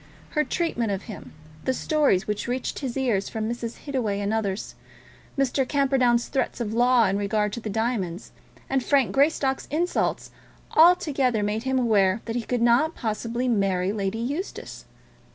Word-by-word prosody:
Her 300 - +2
treatment 300 - -1
of 195 0 -3
him, 215 -4 -9 0.3
the 260 - +1
stories 285 -14 +2
which 210 +1 -3
reached 250 +1 -3
his 265 -2 -4
ears 230 -7 0
from 220 -1 -3
Mrs. 235 0 -5
Hittaway 240 -8 -1
and 205 +1 -1
others, 205 -3 -2 0.6
Mr. 275 0 +1
Camperdown's 260 -4 +2
threats 270 - -2
of 220 -2 -3
law 245 0 +4
in 195 +1 0
regard 210 +1 0
to - - -3
the 220 - -5
diamonds, 210 -5 -2 0.4
and 270 -2 0
Frank 275 -3 +2
Greystock's 275 -1 +1
insults, 340 +5 -1 0.4
altogether 285 - +4
made 215 +3 -2
him 265 0 +1
aware 210 -4 +3
that 230 - -4
he 240 - 0
could 235 +1 -1
not 250 +8 +3
possibly 230 +2 -2
marry 195 -5 +1
Lady 200 0 -2
Eustace. 285 - -5
235 Hz, 160 wpm, -25 LUFS, 210-265 Hz, 0.6 s, law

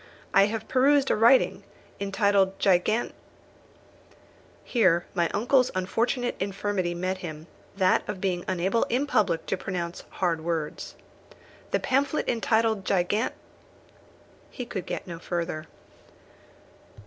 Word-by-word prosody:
I 195 +1 +6
have 220 0 -4
perused 270 +1 +3
a - - +3
writing, 235 +4 +4 0.4
entitled 200 -1 +2
Gigan 200 +5 +2 0.8
" - - -28 0.7
Here 180 -8 +2
my 170 -2 +1
uncle's 250 +4 +2
unfortunate 235 +6 -1
infirmity 195 -2 -2
met 185 +2 -2
him 155 -3 -7 0.3
that 185 -2 +2
of 190 - -4
being 180 -2 -1
unable 190 +5 0
in 255 +4 0
public 195 - +1
to 195 - -1
pronounce 175 -2 -4
hard 170 -4 -1
words. 165 -3 -3 0.7
"The - - +1
pamphlet 275 +3 0
entitled 225 -3 +1
Gigan 200 +5 0 0.6
" - - -28 0.2
He 250 - -6
could 190 -6 -6
get - - -4
no 170 -2 -7
further. 165 -2 -4
195 Hz, 125 wpm, -26 LUFS, 175-230 Hz, 0.8 s, I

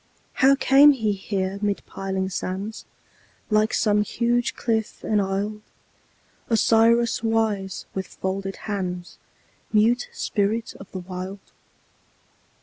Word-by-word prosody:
How 270 +1 +7
came 280 +2 +6
he 220 -5 0
here 195 -1 -3
mid 205 -1 -1
piling 190 -1 -3
sands, 195 +4 -4 0.7
Like 215 +1 +3
some 210 -1 +2
huge 240 +3 0
cliff 220 -2 -2
enisled, 205 +1 -1 0.9
Osiris 230 +1 +3
wise, 220 -4 -1
with 190 -1 -4
folded 195 +1 -4
hands, 180 -4 -4 0.5
Mute 230 +3 +3
spirit 215 +2 -1
of 195 - -12
the - - -6
Wild? 185 +2 -7
210 Hz, 105 wpm, -24 LUFS, 195-225 Hz, 0.9 s, How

